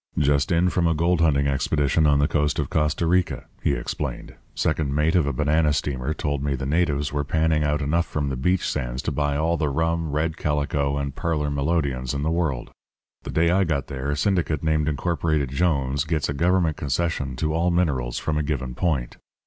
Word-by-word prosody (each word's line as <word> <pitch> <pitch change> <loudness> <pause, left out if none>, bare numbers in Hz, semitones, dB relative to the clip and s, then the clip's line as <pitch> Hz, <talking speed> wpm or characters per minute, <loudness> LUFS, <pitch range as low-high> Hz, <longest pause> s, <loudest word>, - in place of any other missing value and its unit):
"'Just 70 +1 +2
in 85 +1 +3
from 90 -1 +1
a 85 - +2
gold 85 +2 +2
hunting 70 -4 +3
expedition 70 +2 +1
on 70 -1 +4
the 70 +1 +3
coast 75 -2 0
of 75 -5 -2
Costa 75 +2 +1
Rica,' 85 -7 +1 0.2
he - - +1
explained. - - -4 0.2
'Second 75 -3 0
mate 75 +2 +2
of 85 -6 +3
a - - +1
banana 75 +3 +2
steamer 70 -1 -2
told 75 -2 -2
me 70 -1 0
the 65 - -4
natives 75 -2 0
were 75 0 0
panning 80 +1 +1
out 75 0 0
enough 85 +4 +1
from 70 -2 -2
the 65 - -2
beach 90 +8 +1
sands 60 +2 -3
to - - -1
buy 75 0 0
all 80 +3 +1
the 75 -3 0
rum, 80 +2 0
red 80 +2 -1
calico, 70 -1 0
and 70 -1 -3
parlour 75 -3 -1
melodeons 70 -3 -1
in 70 - -2
the 80 - 0
world. 80 -8 -1 0.5
The - - -9
day 85 +1 +2
I 95 +2 +3
got 75 -6 -2
there 70 0 -4
a 75 - -1
syndicate 80 -4 0
named 75 -1 +1
Incorporated 80 -2 0
Jones 70 -3 +1
gets 75 -2 -1
a 70 - -2
government 85 +1 +1
concession 70 -1 -1
to 75 +4 -1
all 85 +2 +1
minerals 70 -9 0
from 75 -1 -1
a - - 0
given 65 -4 -3
point. 65 -4 -1
75 Hz, 205 wpm, -24 LUFS, 70-80 Hz, 0.5 s, on